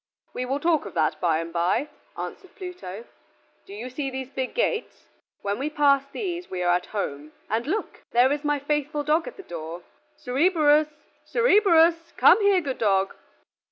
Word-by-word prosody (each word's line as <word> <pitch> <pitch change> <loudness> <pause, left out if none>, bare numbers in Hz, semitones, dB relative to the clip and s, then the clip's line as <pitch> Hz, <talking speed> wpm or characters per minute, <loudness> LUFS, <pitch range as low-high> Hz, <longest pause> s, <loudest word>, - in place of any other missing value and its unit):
"We 255 - -3
will 270 +3 -1
talk 320 -7 +1
of 195 - -11
that 155 -2 0
by 165 -3 +2
and 165 +1 -5
by," 180 - +1 0.3
answered 380 - -7
Pluto. 360 - -8 0.6
"Do 195 - -10
you 230 +4 -6
see 270 +2 -4
these 265 0 -6
big 260 -2 -4
gates? 485 -1 -1 0.4
When 200 +2 -2
we 285 +3 -1
pass 280 -2 +3
these 355 -2 -4
we 180 -1 -3
are 175 0 +3
at 180 0 -1
home; 150 -7 -4 0.2
and 230 +4 0
look! 405 +8 -3
there 245 +3 +4
is 290 +1 -1
my 295 0 +1
faithful 295 +1 -1
dog 310 +3 +1
at - - -8
the 390 - -9
door! 170 - -7 0.3
Cerberus; 300 +2 +3 0.4
Cerberus, 345 -8 +4
come - - +6
here, 400 -2 +4
good 275 -5 -4
dog." 195 -3 +2
280 Hz, 175 wpm, -25 LUFS, 200-330 Hz, 0.6 s, come